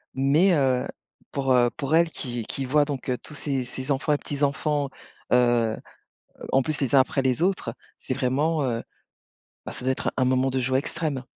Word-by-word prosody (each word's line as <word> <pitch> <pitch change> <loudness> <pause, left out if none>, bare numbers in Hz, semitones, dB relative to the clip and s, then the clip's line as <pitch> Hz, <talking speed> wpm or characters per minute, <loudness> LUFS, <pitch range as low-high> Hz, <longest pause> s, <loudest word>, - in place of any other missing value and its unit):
Mais, 145 +8 +4
heu, 130 -3 +2 0.4
pour, 135 -2 +1
heu, 120 -1 +5
pour 150 -1 0
elle 170 0 +4
qui 120 -7 -5
qui 135 - -4
voit 145 +3 +3
donc, 140 -3 -5
heu, 125 - +1
tous 150 - -10
ses 135 -3 -2
ses 130 +3 -5
enfants 140 +2 +1
et - - +2
petits-enfants, 145 0 -1 0.4
heu, 120 -3 +3
heu - - -18 0.5
en 135 - +4
plus 155 0 -2
les 135 -1 0
uns 135 - +8
après 130 +1 +1
les 130 +3 +1
autres, 180 -11 0 0.2
c'est 130 - -3
vraiment 145 +4 +1
heu, 115 -3 -1 0.8
bah, - - -5
ça 125 - -7
doit 130 - +3
être 130 - -2
un 130 - +3
moment 130 +1 +2
de 130 - 0
joie 130 +1 +1
extrême. 145 -2 -3
135 Hz, 200 wpm, -25 LUFS, 125-145 Hz, 0.8 s, uns